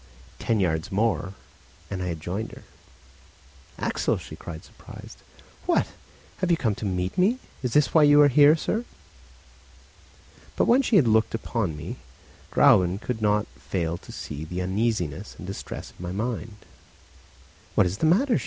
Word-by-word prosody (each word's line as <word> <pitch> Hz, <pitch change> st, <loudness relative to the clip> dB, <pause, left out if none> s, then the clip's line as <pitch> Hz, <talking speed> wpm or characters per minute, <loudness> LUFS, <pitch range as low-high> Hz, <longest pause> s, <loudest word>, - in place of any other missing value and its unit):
Ten 115 Hz, -2 st, 0 dB
yards 80 Hz, -4 st, 0 dB
more, 95 Hz, -3 st, 0 dB, 0.6 s
and 95 Hz, -2 st, -3 dB
I 90 Hz, -, -2 dB
had 85 Hz, -2 st, -3 dB
joined 95 Hz, +7 st, -4 dB
her. -, -, -12 dB, 1.1 s
"Axel!" -, -, 0 dB
she -, -, -9 dB
cried 80 Hz, -2 st, -8 dB
surprised. -, -, -13 dB, 0.5 s
"What! -, -, +3 dB, 0.5 s
have 185 Hz, -, -1 dB
you 170 Hz, -, +4 dB
come 115 Hz, -9 st, 0 dB
to 105 Hz, -, -6 dB
meet 90 Hz, -, -2 dB
me? 210 Hz, +8 st, +4 dB, 0.2 s
Is 125 Hz, -3 st, -2 dB
this 150 Hz, -2 st, +3 dB
why 160 Hz, -, +6 dB
you 145 Hz, 0 st, +7 dB
are -, -, +7 dB
here, 145 Hz, +3 st, +6 dB
sir?" 220 Hz, +8 st, -2 dB, 1.7 s
But -, -, +2 dB
when 250 Hz, +3 st, +5 dB
she 245 Hz, -4 st, +1 dB
had 155 Hz, -11 st, +6 dB
looked 110 Hz, 0 st, +3 dB
upon 110 Hz, -8 st, -2 dB
me, 75 Hz, -, -6 dB, 0.5 s
Gräuben 90 Hz, +1 st, +5 dB
could 115 Hz, -1 st, -4 dB
not 105 Hz, 0 st, +2 dB, 0.2 s
fail 85 Hz, -3 st, -1 dB
to -, -, -12 dB
see 75 Hz, 0 st, -6 dB
the 90 Hz, +3 st, -5 dB
uneasiness 95 Hz, -5 st, -1 dB
and 90 Hz, -, -9 dB
distress 95 Hz, +2 st, -7 dB
of -, -, -25 dB
my 90 Hz, 0 st, -5 dB
mind. 110 Hz, +1 st, -3 dB, 1.2 s
"What 105 Hz, -, +5 dB
is 90 Hz, +4 st, -2 dB
the 160 Hz, -, +3 dB
matter?" 230 Hz, -, +3 dB
105 Hz, 165 wpm, -25 LUFS, 90-145 Hz, 1.7 s, you